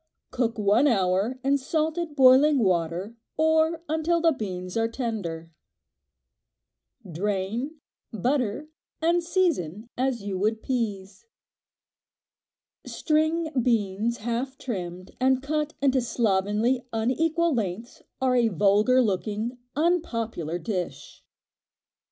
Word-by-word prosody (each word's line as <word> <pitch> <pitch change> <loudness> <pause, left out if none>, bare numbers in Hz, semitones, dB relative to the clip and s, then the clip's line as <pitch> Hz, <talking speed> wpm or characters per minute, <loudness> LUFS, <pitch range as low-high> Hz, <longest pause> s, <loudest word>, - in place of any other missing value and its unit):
Cook 240 -2 -1
one 210 +7 +3
hour 200 +2 +1
in 280 +1 +2
salted 315 +2 -2
boiling 270 +2 +6
water, 185 0 0 0.2
or 320 +1 +2
until 320 +2 +1
the 330 0 +4
beans 185 - -5
are 225 0 +2
tender. 200 -10 -4 1.6
Drain, 205 - -2 0.4
butter 250 +4 -1 0.3
and 340 +2 +2
season 275 - -1
as 250 -4 -1
you 195 -2 -3
would 215 +2 0
peas. 205 - -3 1.6
String 315 +1 0
beans 225 -1 0
half 240 +4 -3
trimmed 185 -7 -6
and 260 +1 +2
cut 300 +1 -2
into 265 -2 +3
slovenly, 225 +2 +1
unequal 320 +9 +1
lengths 225 0 -4 0.2
are 260 -1 +2
a 240 -2 +4
vulgar 210 +6 +3
looking, 215 +4 -2 0.2
unpopular 230 - -1
dish. 180 -1 -5
235 Hz, 100 wpm, -26 LUFS, 200-290 Hz, 1.6 s, boiling